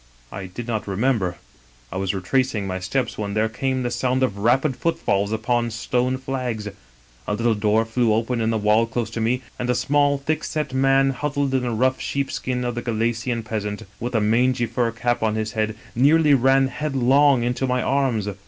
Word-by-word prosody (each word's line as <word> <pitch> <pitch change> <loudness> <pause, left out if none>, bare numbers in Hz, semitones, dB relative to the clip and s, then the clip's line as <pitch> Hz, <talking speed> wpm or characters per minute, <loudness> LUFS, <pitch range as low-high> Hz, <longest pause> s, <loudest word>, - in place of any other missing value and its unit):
I 95 -1 -6
did 115 +6 -7
not 110 -3 -2
remember. 100 -3 0 0.5
I 95 - -4
was 95 -1 0
retracing 110 +2 0
my 95 -1 -3
steps 115 +6 -2
when 100 -1 -3
there 110 +1 +2
came 130 +3 -2
the 120 - -2
sound 130 +2 0
of 100 -6 -1
rapid 130 +6 +2
footfalls 120 -12 0
upon 120 +2 0
stone 125 +3 -1
flags; 125 -5 -3 0.6
a - - 0
little 115 +1 +2
door 105 +1 +2
flew 115 0 +1
open 115 +2 0
in 110 - +1
the 115 - +1
wall 105 +2 +3
close 115 -1 -3
to 115 - -3
me, 125 +3 0 0.2
and 125 - -2
a 125 - +2
small, 145 +3 +2
thick 155 +3 -2
set 150 -4 -3
man, 135 +1 +3
huddled 140 0 -2
in 130 - +2
the 125 - -2
rough 130 +3 +1
sheep 140 -1 -2
skin 125 -1 -2
of 120 - -1
the 120 - -4
Galician 115 0 -1
peasant, 105 -1 -4 0.2
with 120 +1 -4
a - - +4
mangy 120 +3 +2
fur 115 +1 0
cap 120 +1 -1
on 110 -1 +1
his 110 0 -2
head, 110 0 -1 0.2
nearly 150 +4 +4
ran 135 +1 +4
headlong 135 -2 +3
into 125 +2 -1
my 125 0 0
arms. 130 -6 0
120 Hz, 200 wpm, -22 LUFS, 110-130 Hz, 0.6 s, a